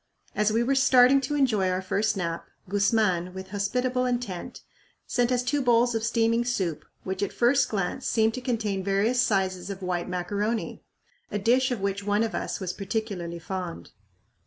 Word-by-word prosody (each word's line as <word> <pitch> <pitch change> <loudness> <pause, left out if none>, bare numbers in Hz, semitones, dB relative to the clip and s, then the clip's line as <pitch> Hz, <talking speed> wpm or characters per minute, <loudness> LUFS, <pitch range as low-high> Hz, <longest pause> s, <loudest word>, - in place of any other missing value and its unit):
As 210 0 +1
we 230 +2 +2
were 270 +3 +1
starting 265 0 +5
to 295 +3 -2
enjoy 220 -10 +2
our 185 0 0
first 210 +2 0
nap, 170 -2 -3 0.2
Guzman, 195 -3 +1
with 190 0 -7
hospitable 250 +6 0
intent, 240 -8 -4 0.4
sent 245 0 +1
us 250 -1 +1
two 280 +3 0
bowls 240 -1 +3
of 225 -1 -1
steaming 230 0 +2
soup, 190 -10 -2 0.2
which 190 0 -4
at 200 - -1
first 255 +3 +3
glance 200 +5 -2
seemed 225 -1 +2
to 255 - -5
contain 220 -6 -1
various 205 +6 +2
sizes 190 -4 0
of 195 -1 -6
white 180 -1 -2
macaroni 205 +5 -2 0.5
a - - -2
dish 245 +6 +3
of 245 -6 -3
which 200 0 -2
one 205 +2 +1
of 225 - -2
us - - -3
was 185 -2 -3
particularly 195 -4 -4
fond. 180 0 -6
210 Hz, 175 wpm, -26 LUFS, 190-245 Hz, 0.5 s, starting